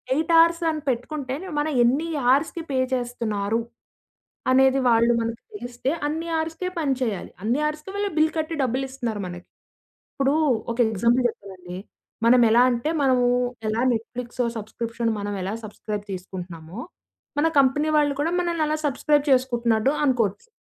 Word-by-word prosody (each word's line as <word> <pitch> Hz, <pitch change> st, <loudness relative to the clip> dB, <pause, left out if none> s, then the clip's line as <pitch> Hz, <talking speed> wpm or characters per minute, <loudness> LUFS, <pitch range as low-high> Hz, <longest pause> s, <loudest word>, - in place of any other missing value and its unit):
8 320 Hz, +2 st, 0 dB
ఆర్స్‌ 335 Hz, +1 st, +3 dB
అని 305 Hz, -1 st, -4 dB
పెట్టుకుంటే 260 Hz, +2 st, -3 dB, 0.3 s
మనం 305 Hz, +1 st, 0 dB
ఎన్ని 280 Hz, +8 st, +2 dB, 0.3 s
ఆర్స్‌కి 325 Hz, +3 st, -1 dB
పే 260 Hz, -, +1 dB
చేస్తున్నారు? 230 Hz, -3 st, -1 dB, 0.9 s
అనేది 265 Hz, +1 st, +5 dB
వాళ్ళు 235 Hz, +1 st, +4 dB
మనకు 230 Hz, 0 st, -4 dB
తెలిస్తే 245 Hz, -5 st, -3 dB, 0.2 s
అన్ని 325 Hz, +3 st, -3 dB
ఆర్స్‌కే 325 Hz, +3 st, -3 dB
పనిచేయాలి. 255 Hz, -, -1 dB
అన్ని 240 Hz, +6 st, +1 dB
ఆర్స్‌కే 305 Hz, +5 st, -8 dB
వాళ్ళు 405 Hz, 0 st, -1 dB
బిల్ 315 Hz, 0 st, +4 dB
కట్టి 315 Hz, +1 st, -2 dB
డబ్బులిస్తున్నారు 255 Hz, -4 st, -2 dB
మనకి. 175 Hz, 0 st, -9 dB, 0.7 s
ఇప్పుడు 275 Hz, +1 st, +1 dB, 0.4 s
ఒక 230 Hz, -, -5 dB
ఎగ్జాంపుల్ 235 Hz, +4 st, +2 dB
చెప్తానండి. 185 Hz, -4 st, -9 dB, 0.5 s
మనం 245 Hz, +1 st, +6 dB
ఎలా 240 Hz, +2 st, +6 dB
అంటే 240 Hz, +6 st, -1 dB
మనము, 255 Hz, -2 st, +3 dB, 0.4 s
ఎలా 225 Hz, +2 st, 0 dB
నెట్‌ఫ్లిక్స్ 240 Hz, +2 st, -4 dB, 0.2 s
సబ్స్‌క్రిప్షన్ 230 Hz, +2 st, -3 dB
మనం 205 Hz, 0 st, -3 dB
ఎలా 195 Hz, -, -3 dB
సబ్స్‌క్రైబ్ 210 Hz, -1 st, -6 dB
తీసుకుంటున్నామో, 180 Hz, 0 st, -8 dB, 0.6 s
మన 320 Hz, -, +3 dB
కంపెనీ 290 Hz, +3 st, +3 dB
వాళ్ళు 290 Hz, -1 st, +3 dB
కూడా 330 Hz, +3 st, 0 dB
మనల్నలా 320 Hz, -3 st, 0 dB
సబ్స్‌క్రైబ్ 290 Hz, +1 st, +2 dB
చేసుకుంటున్నట్టు 240 Hz, -1 st, +2 dB
అనుకోవచ్చు. 245 Hz, -, 0 dB
250 Hz, 135 wpm, -24 LUFS, 225-295 Hz, 0.9 s, మనం